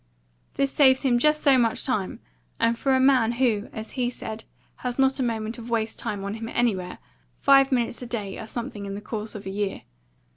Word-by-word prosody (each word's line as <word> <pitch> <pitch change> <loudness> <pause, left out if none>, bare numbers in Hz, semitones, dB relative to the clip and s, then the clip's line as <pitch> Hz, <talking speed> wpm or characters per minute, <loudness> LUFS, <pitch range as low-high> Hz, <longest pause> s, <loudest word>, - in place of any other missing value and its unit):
This 275 -1 +1
saves 265 -2 +5
him 245 -3 +3
just 300 +3 +2
so 270 -3 +6
much 230 -2 +1
time; 215 -9 -2 0.4
and 230 0 +3
for 265 +2 +1
a - - +3
man 260 -4 +4
who, 235 -4 +1
as 220 0 -7
he 250 -2 -1
said, 220 -2 -7 0.3
has 245 -1 -4
not 270 0 +3
a - - +1
moment 225 -1 -2
of 230 +1 -9
waste 225 -1 -1
time 210 -4 -3
on 200 +1 -3
him 225 +1 -6
anywhere, 190 -8 -1 0.4
five 275 0 +5
minutes 240 -2 0
a 245 - -6
day 210 -5 -4
are 220 - -7
something 230 -4 -5
in 195 - -5
the - - -5
course 215 0 -5
of 205 - -8
a 190 - -4
year. 200 0 -3
235 Hz, 215 wpm, -25 LUFS, 215-260 Hz, 0.4 s, so